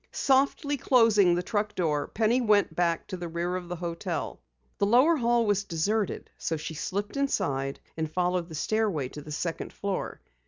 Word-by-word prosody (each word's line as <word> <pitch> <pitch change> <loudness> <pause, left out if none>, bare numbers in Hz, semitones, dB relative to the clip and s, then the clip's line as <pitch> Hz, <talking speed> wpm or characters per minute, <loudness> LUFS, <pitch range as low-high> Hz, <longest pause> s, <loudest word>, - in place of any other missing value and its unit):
Softly 280 +2 +2
closing 220 -9 +4
the 175 - -1
truck 210 0 -2
door, 150 -5 0
Penny 230 +3 +1
went 210 -3 +3
back 170 -2 +1
to 185 - -6
the 175 -1 -5
rear 170 +2 -2
of 180 -1 -5
the 175 - -3
hotel. 170 -1 -4 0.4
The 200 - +3
lower 255 +10 +5
hall 235 -2 +2
was 205 -1 +1
deserted 200 +4 -1
so 165 - -1
she 155 +1 -6
slipped 200 - -3
inside, 135 - -1 0.2
and 160 -1 -3
followed 180 0 0
the 160 - -7
stairway 190 -6 0
to 150 - -9
the 150 - -10
second 165 +2 -3
floor. 200 -2 -4
185 Hz, 180 wpm, -28 LUFS, 165-220 Hz, 0.4 s, lower